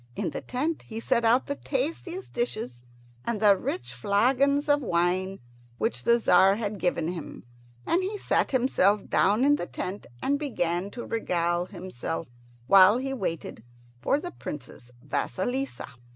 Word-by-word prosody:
In - - -2
the - - -5
tent 300 +6 -2
he 225 -1 -7
set 235 0 +1
out 235 +3 +4
the 285 - -2
tasty 300 +6 -3 0.2
dishes 215 - -3 0.4
and 235 -3 -2
the 205 -2 +6
rich 125 -9 -4
flagons 255 - +2
of 290 0 +3
wine 185 -1 0 0.4
which 120 +1 -2
the 235 - +5
Tzar 195 -3 +5
had 205 -2 -3
given 170 -3 0
him, 175 -3 -7 0.4
and 350 - +2
he 395 +3 -3
sat - - +1
himself 210 -6 +2
down 210 +7 +3
in 290 +1 +5
the 175 - -4
tent 190 +3 -5 0.2
and 285 +1 +1
began 180 - -1
to 240 +3 -7
regale 175 -5 0
himself, 175 - -5 0.4
while 195 - +7
he 270 +1 -3
waited 165 - -4 0.4
for 280 - +2
the 355 +3 -6
Princess 130 - -8
Vasilissa. 260 - -2
210 Hz, 150 wpm, -27 LUFS, 175-265 Hz, 0.4 s, while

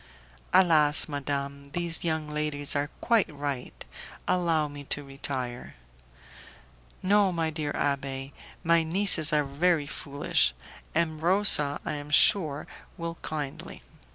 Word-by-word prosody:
"Alas! 155 -5 +4
madame, 140 -1 -5
these 170 -1 +1
young 160 -2 -2
ladies 150 -1 -1
are 145 0 -1
quite 225 -7 +1
right. 140 -3 -6 0.4
Allow 170 -4 0
me 145 0 -10
to 145 - -3
retire." 135 -3 -7 1.3
"No, 200 0 +3
my 165 -2 -2
dear 150 -2 -4
abbé, 135 -1 -3 0.3
my 170 -1 +3
nieces 165 -1 +4
are 150 -1 +2
very 150 +3 0
foolish; 140 - -1 0.4
M. 160 -2 -1
Rosa, 170 -5 +5
I - - -3
am 145 0 -9
sure, 150 -1 +3 0.3
will 165 0 -6
kindly." 145 -3 -7
150 Hz, 120 wpm, -26 LUFS, 140-170 Hz, 1.3 s, Rosa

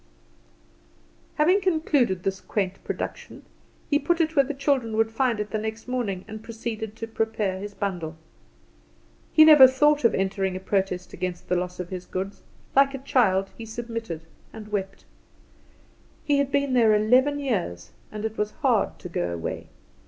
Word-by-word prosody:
Having 360 +6 +3
concluded 295 - +1
this 195 -1 -2
quaint 195 -3 -3
production, - - -6 0.4
he 290 - +2
put 335 +4 0
it 325 -1 +1
where 280 - +6
the 280 +2 -5
children 265 -6 0
would 225 0 +2
find 235 -1 0
it 210 0 -4
the 215 - -1
next 220 +2 -5
morning, 220 -7 -2
and 215 0 -8
proceeded 220 -2 -5
to 225 - -5
prepare 220 -4 -1
his 205 +1 -7
bundle. 175 -5 -3 1.2
He 310 - +8
never 300 -4 +10
thought 295 +3 +3
of 230 - +4
entering 190 -1 -1
a - - -3
protest 190 -2 -2
against 180 -1 -5
the 180 - +2
loss 180 0 -3
of 180 -1 -5
his 180 -1 -6
goods; 190 +2 -5 0.3
like 275 0 +5
a - - -3
child, 195 -8 +1
he 230 - -9
submitted, 230 -6 -5 0.3
and 215 -1 -10
wept. 195 -2 -4 1.2
He 285 -1 +2
had 280 -1 0
been 280 -1 +1
there 225 -4 +5
eleven 255 +7 +3
years, 185 - -3 0.2
and 215 0 -5
it 220 0 -4
was 210 0 0
hard 250 -8 +1
to - - -6
go 90 - -2
away. 85 -1 -5
220 Hz, 165 wpm, -25 LUFS, 190-265 Hz, 1.2 s, never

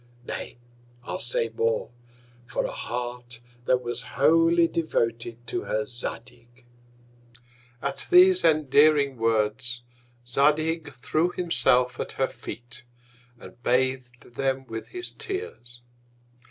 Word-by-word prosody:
Nay, - - -6 0.5
I'll - - -4
say 115 -1 +2
more, 115 +1 -1 0.6
for 120 - -1
a - - -3
Heart 120 0 -5 0.3
that 125 +1 +2
was 120 0 -2 0.2
wholly 165 +4 +5
devoted 120 -8 -2
to - - -3
her 110 0 -1
Zadig! 120 +1 -6 1.2
At - - -3
these 365 +1 +7
endearing 145 -2 +4
Words, 115 +2 0 0.4
Zadig 150 +4 +1
threw 155 +7 0
himself 125 -9 +2
at - - -4
her 135 - +1
Feet, 120 0 -9 0.6
and 120 - -13
bath'd 125 -1 -1
them 135 +1 -1
with 115 -3 -6
his 360 -1 -6
Tears. 120 - -7
125 Hz, 110 wpm, -26 LUFS, 120-155 Hz, 1.2 s, these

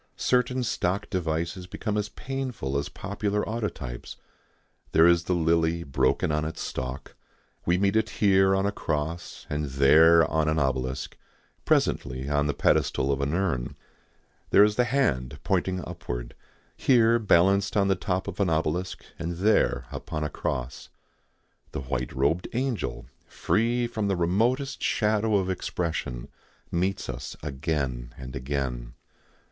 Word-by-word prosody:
Certain 125 0 +1
stock 100 -3 -1
devices 85 0 -2
become 105 +3 -3
as 105 0 -1
painful 125 - -4
as 70 +1 -1
popular 100 +1 -2
autotypes. 100 - -4 0.8
There 80 - +6
is 85 -1 +4
the 90 - +1
lily 85 0 +2
broken 65 +1 +1
on 75 0 0
its 80 +1 -5
stalk; 65 +1 -5 0.5
we 85 +1 +3
meet 100 +2 +2
it 110 0 +2
here 95 -1 +4
on 95 0 +1
a 100 - +1
cross 80 -1 -4
and 75 +1 -2
there 75 +5 +6
on 80 -1 +1
an 80 - +1
obelisk, 65 -2 -1 0.5
presently 65 +2 +1
on 75 0 +1
the 75 - -1
pedestal 70 -1 +2
of 70 0 -1
an 70 +3 0
urn. 80 -11 -1 0.7
There 100 - +7
is 105 0 +3
the 125 - +3
hand 100 - 0
pointing 95 -1 0
upward, 60 -9 -6 0.4
here 120 -3 +4
balanced 100 0 +3
on 100 -1 +3
the 95 - +4
top 95 0 -2
of 100 -1 -6
an 100 -3 +2
obelisk 80 +3 -1
and 85 +1 -3
there 90 - +2
upon 75 0 -4
a 75 - -3
cross. 60 +1 -4 0.8
The - - -3
white 65 -2 -3
robed 70 +7 0
angel, 120 - -2 0.2
free 120 +2 +1
from 110 -3 -2
the 100 - +1
remotest 115 +11 +1
shadow 110 -1 +1
of 95 -2 +2
expression, 80 -9 -3 0.4
meets 95 +3 -1
us - - -6
again 65 -5 -3
and 65 0 -8
again. 65 -3 -3
85 Hz, 145 wpm, -26 LUFS, 70-100 Hz, 0.8 s, There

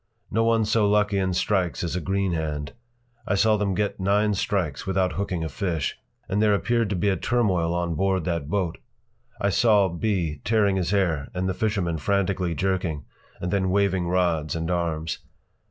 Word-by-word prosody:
No 115 +2 +2
one 115 -1 +3
so 105 -1 +2
lucky 105 -1 +2
in 95 -1 0
strikes 90 -3 0
as 85 0 -2
a 90 - -1
green 95 +1 0
hand! 75 -3 -3 0.5
I 100 - +1
saw 110 +2 +4
them 100 -2 0
get 105 0 -1
nine 105 +2 +2
strikes 95 -6 -1
without 95 -1 +1
hooking 90 -3 -2
a - - -1
fish. 80 -2 -2 0.3
And 100 +1 0
there 105 -1 +4
appeared 115 +1 +1
to 100 - -1
be 95 +3 +1
a 95 - +2
turmoil 95 -10 +1
on 85 -1 -1
board 95 0 0
that 85 -5 -2
boat. 90 -3 -1 0.6
I 100 - +1
saw 105 -3 +4
B. 85 -4 -1
tearing 105 -3 +2
his 90 -3 -1
hair 85 -8 +1
and 90 +1 -1
the 95 - 0
fishermen 90 -6 -1
frantically 95 -1 0
jerking, 90 -4 -1 0.3
and 90 - -3
then 95 -2 +1
waving 95 -2 +1
rods 85 -4 +1
and 80 +1 -2
arms. 80 -2 -2
95 Hz, 185 wpm, -25 LUFS, 85-100 Hz, 0.6 s, saw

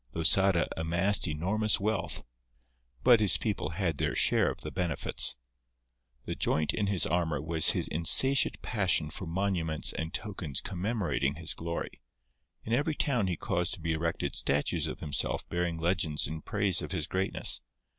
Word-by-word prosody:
Losada 85 +2 +3
amassed 85 +5 +1
enormous 95 +8 0
wealth, 105 +1 -2 0.8
but 120 -2 +6
his 105 -3 +4
people 100 -8 -3
had 85 -3 -2
their - - -1
share - - +3
of - - -7
the - - -6
benefits. 90 -6 +1 0.9
The - - -4
joint 75 -1 -1
in 105 -2 -1
his 100 -3 +2
armour 85 -2 -1
was 80 0 +3
his - - +2
insatiate 125 - +5
passion 90 -9 0
for 95 - -7
monuments 85 -3 -1
and 80 0 -4
tokens 95 -9 -4
commemorating 95 - -2
his 80 0 -4
glory. 85 0 -6 0.6
In 115 - -4
every 145 +5 0
town 125 -10 0
he 90 -3 -2
caused 90 +1 -1
to - - -16
be 80 0 -3
erected 80 +1 -3
statues 70 +1 0
of - - -7
himself 75 -2 -2
bearing 85 -1 -2
legends 80 -3 -1
in 80 +2 -6
praise 100 -3 0
of - - -6
his 80 -5 -2
greatness. 95 +3 0
85 Hz, 155 wpm, -29 LUFS, 80-100 Hz, 0.9 s, but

